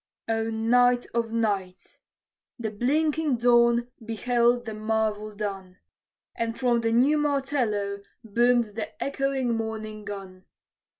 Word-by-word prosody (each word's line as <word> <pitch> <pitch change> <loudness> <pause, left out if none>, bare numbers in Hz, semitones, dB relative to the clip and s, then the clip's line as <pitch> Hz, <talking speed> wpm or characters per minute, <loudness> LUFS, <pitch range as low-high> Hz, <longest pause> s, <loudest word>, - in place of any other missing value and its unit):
O 225 0 0
night 245 +2 +3
of 230 -1 -1
nights! 200 -5 -2 0.6
The 225 -3 -3
blinking 295 +5 +1
dawn 235 0 +4
beheld 240 +2 +1
the 220 - -5
marvel 215 0 -1
done, 195 -3 -6 0.6
And 230 0 -3
from 240 -2 +2
the 225 0 0
new 270 +6 +4
martello 255 -9 -1 0.2
boomed 235 +1 +2
the 215 0 -6
echoing 275 -3 -1
morning 220 -1 -5
gun. 190 -2 -8
230 Hz, 115 wpm, -26 LUFS, 215-245 Hz, 0.6 s, dawn